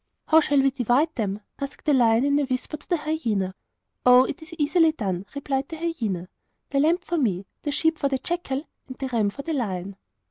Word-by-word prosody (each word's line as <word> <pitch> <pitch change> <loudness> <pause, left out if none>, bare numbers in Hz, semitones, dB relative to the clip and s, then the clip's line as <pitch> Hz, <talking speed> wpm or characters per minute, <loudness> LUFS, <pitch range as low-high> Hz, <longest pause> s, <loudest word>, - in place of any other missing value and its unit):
'How 320 - +6
shall 285 -3 +3
we 275 - +4
divide 260 +5 +2
them?' 210 -5 -2 0.2
asked 275 0 -6
the 300 - +4
lion 235 -1 +4
in 285 0 +3
a 290 - +1
whisper 255 +3 -3
to 295 - -14
the 350 - +2
hyena. 230 - -1 0.5
'Oh, 250 0 +8
it 335 - -4
is 315 +3 -12
easily 315 +1 +3
done,' 195 - -3
replied 275 -1 -2
the 325 - -5
hyena. 225 - -2 0.4
'The 275 - +2
lamb 320 +4 +4
for 350 -2 -2
me, 200 -8 0 0.2
the 295 - -3
sheep 320 +2 +1
for 280 - +1
the 270 - 0
jackal, 295 -3 -3 0.2
and 260 -1 -9
the 265 -1 -3
ram 225 -4 +1
for 280 +7 -8
the 325 - -2
lion. 195 -7 -3
275 Hz, 215 wpm, -25 LUFS, 225-310 Hz, 0.5 s, Oh